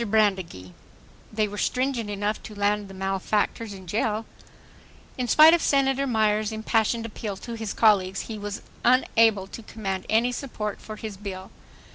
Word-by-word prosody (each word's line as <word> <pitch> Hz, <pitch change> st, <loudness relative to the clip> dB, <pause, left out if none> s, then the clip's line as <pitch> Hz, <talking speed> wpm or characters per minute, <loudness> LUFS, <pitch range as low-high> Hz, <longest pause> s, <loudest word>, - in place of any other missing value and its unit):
BRANDEGEE: 190 Hz, -, 0 dB, 0.6 s
They 215 Hz, 0 st, +1 dB
were 205 Hz, 0 st, -6 dB
stringent 250 Hz, -3 st, -1 dB
enough 205 Hz, +1 st, -2 dB
to 215 Hz, -, -10 dB
land 205 Hz, 0 st, 0 dB
the 195 Hz, -, -11 dB
malefactors 195 Hz, +3 st, -1 dB
in 190 Hz, -2 st, -10 dB
jail.... 215 Hz, +3 st, -1 dB, 0.9 s
In 250 Hz, -1 st, -2 dB
spite 310 Hz, +6 st, +8 dB
of 340 Hz, -, +3 dB
Senator 275 Hz, 0 st, +2 dB
Myers' 215 Hz, -2 st, +1 dB
impassioned 220 Hz, +1 st, 0 dB
appeal 210 Hz, -2 st, -5 dB
to 235 Hz, -, -7 dB
his 220 Hz, -3 st, -4 dB
colleagues, 195 Hz, -4 st, +3 dB
be 220 Hz, -2 st, -6 dB
was 205 Hz, 0 st, -5 dB, 0.2 s
unable 225 Hz, -5 st, +4 dB
to 215 Hz, -, -9 dB
command 195 Hz, -4 st, -5 dB
any 230 Hz, +3 st, +3 dB
support 220 Hz, -5 st, -5 dB
for 215 Hz, -, -8 dB
his 215 Hz, -2 st, -7 dB
bill. 190 Hz, -2 st, -7 dB
215 Hz, 155 wpm, -25 LUFS, 200-230 Hz, 0.9 s, spite